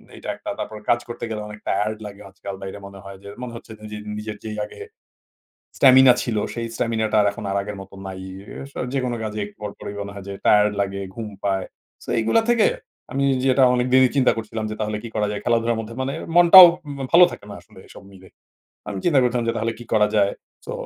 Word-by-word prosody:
এইটা - - -11
১ - - -13
টা। - - -3
তারপর 110 0 -5
কাজ 120 - +4
করতে 120 0 -6
গেলে 105 -1 -4
অনেক 105 0 -10
টায়ারড 105 +2 0
লাগে 100 0 -12
আজকাল। 95 0 -8
বাইরে 95 +1 -7
মনে 100 0 -12
হয় 100 -1 -10
যে 100 - -9
মনে 125 -2 -6
হচ্ছে 115 - -11
নিজের, 105 0 -7 0.2
নিজের 105 0 -6
যেই 110 -1 -6
আগে - - -12 1.0
স্টামিনা 130 -1 +7
ছিল। 115 -3 -2 0.2
সেই 115 -1 -3
স্টামিনাটা 110 -2 0
এখন 100 - -9
আর 100 - -1
আগের 105 0 -7
মত 95 0 -12
নাই 95 -1 -7
ই - - -9 0.3
আসা 140 - -8
যেকোনো 125 -3 -1
কাজে 105 -1 -4 0.2
পরপরই 105 -1 -7
মনে 100 0 -7
হয় 100 -1 -9
যে 100 - -5
টায়ারড 105 0 +5
লাগে, 100 0 -2
ঘুম 115 -2 -6 0.2
পায়। 95 -1 0 0.4
সো - - -19
এগুলা 115 - +3
থেকে 235 -2 +4 0.5
আমি 140 +1 0 0.2
যেটা 130 0 +3
অনেক 125 0 +1
দেরি 130 -1 +6
চিন্তা 130 -2 +4
করছিলাম 110 0 -5
যে - - -4
তাহলে 105 0 -2
কি - - -5
করা 105 -1 +1
যায় 105 -1 -4
খেলাধুলার 115 -1 +1
মধ্যে 115 +1 -8
মানে 135 +2 -3 0.2
মনটাও 175 +1 +11 0.3
মা 135 - -4
ভালো 180 +1 +9
থাকে - - -10
না 100 - -7
আসলে - - -19
এসব - - -13
মিলে। 95 -1 -15 0.6
আমি 100 -2 -4
চিন্তা 150 -6 +4
করছিলাম 120 -1 0
যে - - 0
তাহলে 115 +1 -1
কি 120 - -10
করা 105 -1 +4
যায়। 100 -1 +3 0.3
সো - - -5
110 Hz, 220 wpm, -22 LUFS, 100-125 Hz, 1.0 s, মনটাও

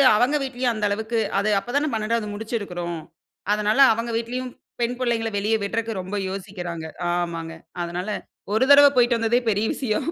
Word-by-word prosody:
அவுங்க 250 +7 +3
வீட்லயும் 255 -2 -1
அந்த 215 -1 -1
அளவுக்கு 220 +3 -1 0.2
அது 205 +2 +1
அப்ப 230 - -12
தான 295 +2 +2
12 220 0 0
ஆவது 205 - -5
முடிச்சுருக்குறோம். 190 -6 -4 0.5
அதனால 210 +4 +1
அவங்க 230 +1 -3
வீட்லயும் 250 +2 -4 0.3
பெண் 235 +1 0
புள்ளைங்கல 235 -3 0
வெளிய 210 +3 +1
விடுறக்கு 225 +2 -2
ரொம்ப 185 +3 -5
யோசிக்கிறாங்க. 180 -4 -5 0.2
ஆமாங்க. 170 -2 -2 0.3
அதனால 175 +2 -4 0.5
ஒரு 220 +4 +3
தடவ 285 0 +10
போய்ட்டு 240 -1 +4
வந்ததே 230 +1 +2
பெரிய 210 0 +1
விஷயம். 220 -6 -1
220 Hz, 160 wpm, -23 LUFS, 195-240 Hz, 0.5 s, தடவ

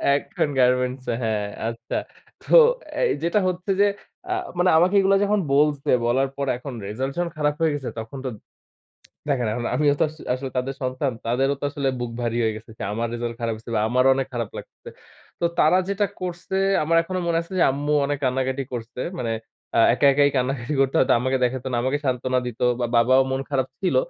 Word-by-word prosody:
এখন 145 - -1
গার্মেন্টসে 125 0 +1
হ্যাঁ, 105 -2 -1 0.2
আচ্ছা। 115 0 -4 0.4
তো - - -4 0.4
অ্যা - - -2 0.2
যেটা 170 +5 +2
হচ্ছে 185 +2 -2
যে - - +6 0.5
আ - - +2 0.2
মানে 180 +1 +3
আমাকে 180 +4 +3
এগুলা 195 0 +4
যখন 205 0 +2
বলছে, 145 -1 +2 0.2
বলার 135 +3 +2
পর 140 - -1
এখন 130 +1 -8
রেজাল্ট 130 +6 -3
যখন 175 -1 0
খারাপ 150 -1 +1
হয়ে 160 -2 +3
গেছে 140 -3 -4
তখন 110 +5 -7
তো 130 - -1 1.0
দেখেন, 125 -5 +1
এখন 120 0 -3
আমি - - -1 0.2
আমিও 145 - +5
তো - - +4
আস 155 - -14 0.2
আসলে 130 +1 -4
তাদের 135 +2 -1
সন্তান। 130 +2 -1
তাদেরও 135 +4 +1
তো - - -7
আসলে 140 -2 -2
বুক 120 -1 -3
ভারী 120 0 -1
হয়ে 110 - +1
গেছে। 110 +1 -11 0.2
আমার 115 +1 -1
রেজাল্ট 120 0 -3
খারাপ 115 -1 0
হইছে 115 +1 -10
বা 105 - +2
আমারও 130 +2 +3
অনেক 135 -1 -1
খারাপ 115 -3 -2
লাগতেছে। - - -11 0.5
তো - - +3
তারা 155 +4 +5
যেটা 200 +1 +1 0.2
করছে 180 +1 -4 0.3
আমার 165 +2 +1
এখনো 185 +2 -4
মনে 165 -1 +2
আছে 170 - -13
যে - - +5
আম্মু 145 +2 -1
অনেক 145 0 -1
কান্নাকাটি 130 +1 0
করছে। 120 +1 -5 0.2
মানে 115 -7 -2 0.5
আ - - +5
একা 125 +3 +1
একাই 145 0 +4
কান্নাকাটি 130 +2 -1
করতে 135 0 +1
হয়তো, 130 - +4
আমাকে 130 +2 0
দেখাইতো 125 +1 -1
না। 120 - 0
আমাকে 135 +3 +1
সান্ত্বনা 130 0 0
দিত 115 - -7 0.2
বা 120 - +1
বাবাও 130 +3 +5
মন 135 0 -1
খারাপ 130 -2 0
ছিল। 190 - +1
130 Hz, 200 wpm, -23 LUFS, 120-150 Hz, 1.0 s, যে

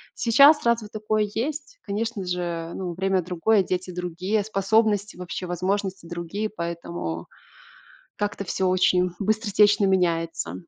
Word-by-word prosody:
Сейчас 280 +6 +6
разве 235 -2 +2
такое 215 0 -1
есть? 305 - -4
Конечно 210 0 -3
же, 175 -2 -3
ну, 180 -2 -4
время 190 0 +1
другое, 185 +4 +2
дети 185 0 -3
другие, 180 +4 -2
способности 210 0 +1
вообще, 180 0 -5
возможности 185 0 -2
другие, 175 +5 -3
поэтому 170 - -5 0.9
как-то 205 -1 -3
всё 185 +1 0
очень 180 0 +3
быстротечно 205 -1 +3
меняется. 170 -3 0
190 Hz, 120 wpm, -24 LUFS, 180-215 Hz, 0.9 s, Сейчас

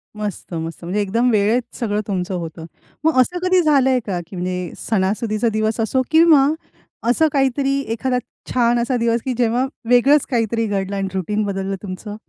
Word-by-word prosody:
मस्त 210 -3 -5
मस्त. 165 +1 -5
म्हणजे 185 +5 -1
एकदम 230 +5 +1
वेळेत 220 +3 +1
सगळं 210 -3 -1
तुमचं 190 -1 -2
होतं. 165 -2 -6 0.4
मग 315 -4 +3
असं 355 +8 -1
कधी 370 0 +4
झालंय 270 -5 +3
का, 185 -4 -2
की 190 - -10
म्हणजे 180 -1 -3
सणासुदीचा 215 +2 0
दिवस 215 +1 0
असो 240 +4 +1
किंवा 320 -4 +6 0.6
असं 315 +6 +4
काहीतरी 275 0 +1
एखादा 250 +2 -1 0.3
छान 240 -1 +2
असा 240 +2 0
दिवस 230 0 +1
कि 260 - -1
जेव्हा 245 +1 +2 0.2
वेगळच 270 +4 +5
काहीतरी 230 -1 0
घडलं 200 -1 -2
आणि 195 -1 -1
रुटीन 205 +3 -1
बदललं 195 -1 -2
तुमचं? 205 +2 -6
225 Hz, 165 wpm, -20 LUFS, 195-255 Hz, 0.6 s, किंवा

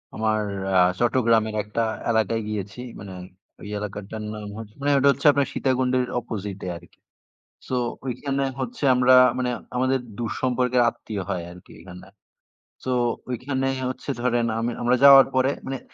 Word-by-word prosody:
আমার 110 0 +1 0.3
অ্যা 95 -1 +3 0.2
চট্টগ্রামের 115 -3 +2
একটা 105 +3 -2 0.3
এলাকায় 115 0 +1
গিয়েছি। 105 +1 -5 0.2
মানে 95 -1 -9 0.5
ওই - - -8
এলাকাটার 105 +1 -6
নাম 105 -1 -7
হচ্ছে 110 -1 -9
মানে 145 - +1
ওটা 135 +1 +3
হচ্ছে 140 - -6
আপনার 140 0 +1
সীতাকুণ্ডের 130 -1 +1
opposite 100 -4 -6
এ - - -4
আরকি। 85 0 -19 0.7
সো - - -2 0.3
ঐখানে 135 +2 -2 0.2
হচ্ছে 230 - -4
আমরা 125 +1 +5 0.2
মানে 125 -1 0 0.3
আমাদের 130 +1 +1 0.2
দূর 115 -2 -2
সম্পর্কের 125 -1 +2
আত্মীয় 105 -4 -5
হয় 90 -2 -2
আরকি 90 0 -15
ওখানটা। 90 +1 -12 0.8
সো 130 - -2 0.4
ঐখানে 130 +2 -2 0.2
হচ্ছে 130 - -6
ধরেন 120 -1 +1
আমি 115 +1 -1
আমরা 120 +1 +3
যাওয়ার 135 -1 +10
পরে 130 +1 +3 0.2
মানে 135 0 -3
120 Hz, 150 wpm, -24 LUFS, 105-130 Hz, 0.8 s, যাওয়ার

